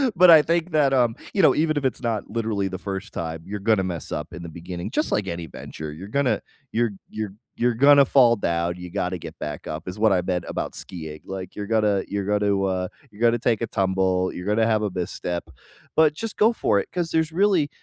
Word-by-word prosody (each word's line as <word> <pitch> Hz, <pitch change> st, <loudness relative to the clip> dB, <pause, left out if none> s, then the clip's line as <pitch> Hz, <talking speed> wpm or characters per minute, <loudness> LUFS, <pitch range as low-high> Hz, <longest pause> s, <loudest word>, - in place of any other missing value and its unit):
But 180 Hz, +1 st, +7 dB
I 160 Hz, -, +9 dB
think 170 Hz, +2 st, 0 dB
that, 145 Hz, -3 st, +3 dB
um, 120 Hz, -3 st, +3 dB, 0.2 s
you 195 Hz, -, +2 dB
know, 160 Hz, -, +6 dB
even 155 Hz, -1 st, +1 dB
if 140 Hz, -, -1 dB
it's 130 Hz, -, -1 dB
not 115 Hz, -4 st, -2 dB
literally 110 Hz, -4 st, -1 dB
the 95 Hz, -1 st, -5 dB
1st 95 Hz, 0 st, -6 dB
time, 80 Hz, -1 st, -4 dB
you're 105 Hz, +1 st, -5 dB
gonna 105 Hz, -1 st, +2 dB
mess 90 Hz, -4 st, -5 dB
up -, -, -4 dB
in 90 Hz, -, -7 dB
the 85 Hz, -, -7 dB
beginning 85 Hz, +2 st, -6 dB
just -, -, 0 dB
like -, -, 0 dB
any 85 Hz, -1 st, -4 dB
venture. 75 Hz, +2 st, -8 dB
You're 90 Hz, +6 st, -9 dB
gonna 140 Hz, +4 st, +1 dB, 0.3 s
you're 115 Hz, -1 st, +1 dB, 0.2 s
you're 110 Hz, -3 st, -5 dB, 0.2 s
you're 120 Hz, 0 st, +2 dB
gonna 140 Hz, +3 st, +7 dB
fall 120 Hz, -3 st, +5 dB
down, 85 Hz, -3 st, -1 dB
you 90 Hz, 0 st, -8 dB
gotta 90 Hz, -2 st, -2 dB
get -, -, -9 dB
back 75 Hz, 0 st, -5 dB
up 75 Hz, +3 st, -6 dB
is 95 Hz, +3 st, -6 dB
what 110 Hz, -1 st, +4 dB
I 90 Hz, -, +2 dB
meant 90 Hz, -1 st, -2 dB
about -, -, -3 dB
skiing. 80 Hz, -3 st, -8 dB
Like, 95 Hz, -1 st, -7 dB
you're 100 Hz, -1 st, -5 dB
gonna 105 Hz, -3 st, +2 dB
you're 100 Hz, -1 st, -3 dB
gonna, 100 Hz, -1 st, +1 dB
uh, 95 Hz, -1 st, 0 dB, 0.2 s
you're 105 Hz, +2 st, -14 dB
gonna 120 Hz, 0 st, +4 dB
take 115 Hz, -2 st, +1 dB
a -, -, -1 dB
tumble, 95 Hz, -1 st, +1 dB
you're 90 Hz, -, -7 dB
gonna 110 Hz, +2 st, +3 dB
have 110 Hz, -1 st, +2 dB
a 105 Hz, -, 0 dB
misstep. 90 Hz, -1 st, -3 dB, 0.5 s
But 155 Hz, -2 st, +5 dB
just 225 Hz, +6 st, -6 dB
go 220 Hz, +3 st, +4 dB
for 105 Hz, -, +2 dB
it -, -, -5 dB
'cause 175 Hz, -2 st, -2 dB
there's 160 Hz, 0 st, +1 dB
really 185 Hz, -4 st, +2 dB
105 Hz, 230 wpm, -24 LUFS, 90-130 Hz, 0.5 s, I